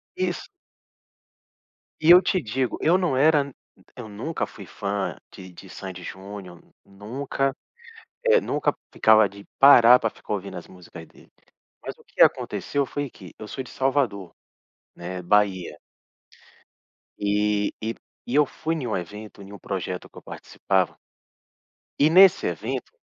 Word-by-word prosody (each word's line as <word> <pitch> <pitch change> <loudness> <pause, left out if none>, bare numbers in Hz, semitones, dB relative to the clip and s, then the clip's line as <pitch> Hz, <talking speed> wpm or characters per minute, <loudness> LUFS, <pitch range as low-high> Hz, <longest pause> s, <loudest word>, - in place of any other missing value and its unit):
Isso. 185 -1 -3 1.5
E 160 +2 +5
eu 180 +1 +9
te 185 - 0
digo, 130 0 -2
eu 165 +3 +3
não 175 -8 0
era 145 0 +3 0.4
eu 125 -3 -8
nunca 110 +11 -4
fui - - -12
fã 100 -1 -3 0.2
de 95 -1 -12
de 90 +2 -14
Sandy 95 -1 -8
e - - -11
Júnior. 95 -2 -9 0.2
Nunca, 130 +7 -3 0.7
eh, 475 0 +5
nunca - - -1 0.2
ficava 110 -1 +5
de 100 +1 -14
parar 125 -3 +8
pra 115 - 0
ficar 105 - -7
ouvindo 100 -2 -5
as 85 - -10
músicas 85 -3 -13
deles, - - -21 0.5
mas - - -6
o - - -21
que - - -12
aconteceu 140 -1 +1
foi 145 -2 -4
que, 90 -4 -14
eu 110 - -8
sou 130 - -5
de 125 - -14
Salvador, 130 -9 -1 0.6
né, 90 +1 -6
Bahia 95 -1 +1 1.4
E 105 0 0
e 115 +1 -3 0.3
e 125 - -1
eu 150 0 +5
fui 160 +4 -4
em 150 -6 -4
um 110 - -2
evento, 105 +4 -9
em 100 - -12
um - - -9
projeto 90 -1 -5
que - - -20
eu - - -9
participava 95 -2 -2 1.0
e 150 - +5
nesse 190 +2 +6
evento - - -4
110 Hz, 150 wpm, -24 LUFS, 100-140 Hz, 1.5 s, eu